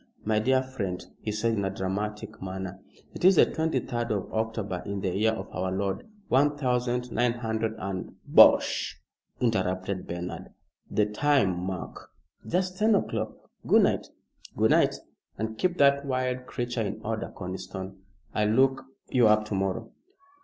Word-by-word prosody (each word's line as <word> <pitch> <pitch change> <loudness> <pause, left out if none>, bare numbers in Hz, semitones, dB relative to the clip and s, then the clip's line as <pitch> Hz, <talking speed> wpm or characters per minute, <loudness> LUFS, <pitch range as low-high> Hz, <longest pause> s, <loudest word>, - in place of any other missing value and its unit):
"My 110 0 +2
dear 130 +4 +3
friend," 100 -9 -4
he 110 - -3
said 110 +2 0
in 100 -2 0
a 95 - 0
dramatic 105 +3 -4
manner, 95 0 -5 0.3
"it - - -8
is 190 +1 +7
the - - +7
twenty 160 0 0
third 120 -2 -3
of 100 -3 -2
October, 110 -4 -2
in 100 -1 -4
the 95 -1 -1
year 110 +3 +3
of 110 - -5
our 95 0 -2
Lord 95 - -2 0.2
one 145 +3 +3
thousand 125 -2 0
nine 120 +1 +2
hundred 110 -2 -2
and 95 -1 -5
" - - -37 0.2
"Bosh!" - - +4 0.4
interrupted 95 -4 -1
Bernard. 85 +1 -6 0.3
"The 105 - +2
time, 105 -2 +2
Mark?" 90 0 -5 0.4
"Just 185 +1 -1
ten 215 0 +4
o'clock. - - -3 0.2
Good - - +6
night!" - - +1 0.5
"Good - - +4
night, - - +4 0.4
and 110 +1 -3
keep 180 -1 +1
that 140 0 +5
wild 130 -1 -2
creature 120 -1 -2
in 105 0 -3
order. 110 0 -3
Conniston, 95 +1 -6 0.4
I'll 105 -1 +2
look 130 +4 +3 0.3
you 120 -3 +5
up 105 0 +4
to - - -2
morrow." 95 -1 -2
110 Hz, 160 wpm, -27 LUFS, 95-125 Hz, 0.5 s, is